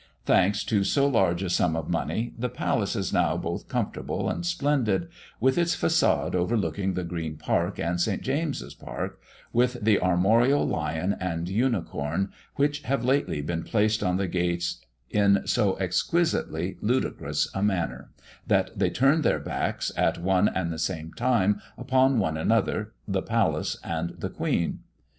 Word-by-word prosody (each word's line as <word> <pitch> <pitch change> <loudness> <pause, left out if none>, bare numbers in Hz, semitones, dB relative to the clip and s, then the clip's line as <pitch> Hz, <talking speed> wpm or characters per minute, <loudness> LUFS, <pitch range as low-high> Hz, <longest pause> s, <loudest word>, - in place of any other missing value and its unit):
Thanks 100 +2 +3
to 100 -3 +1
so 140 +7 +2
large 95 -8 +2
a 95 - -2
sum 85 -2 +2
of 80 -2 -3
money, 110 +7 -2
the 125 +2 -2
palace 125 - -1
is - - -2
now - - +2
both - - -4
comfortable - - -2
and - - -4
splendid, 145 - 0 0.3
with 130 +7 +3
its 170 0 +2
façade 85 - +2
overlooking 95 0 0
the 90 - -2
Green 80 -3 -4
park 75 - 0
and 85 +1 -1
St. - - 0
James's 145 +2 -2
park, - - -6 0.3
with 125 +1 +2
the 105 -1 +4
armorial 110 +10 +3
lion 90 +5 -1
and 85 -2 -2
unicorn, 95 - -1 0.2
which 145 +1 +1
have 140 -2 -1
lately 130 - +1
been 85 +2 -2
placed 110 +5 +1
on 90 0 +1
the 95 0 -1
gates 85 -1 -1 0.3
in 100 -1 +3
so 100 -3 +2
exquisitely 95 - 0
ludicrous 125 +5 0
a 95 - -2
manner, 85 -10 -1 0.4
that - - +2
they - - +1
turn 140 +5 +3
their - - +2
backs, - - -2
at - - +1
one 95 +3 +2
and 85 -3 -2
the 80 - -6
same 80 -1 -3
time, 105 -5 +2 0.2
upon 130 +1 +3
one 80 -7 0
another, 80 - +1 0.2
the - - 0
palace, - - 0
and 85 +1 -3
the - - -4
queen. 85 - -1
100 Hz, 155 wpm, -26 LUFS, 85-125 Hz, 0.4 s, the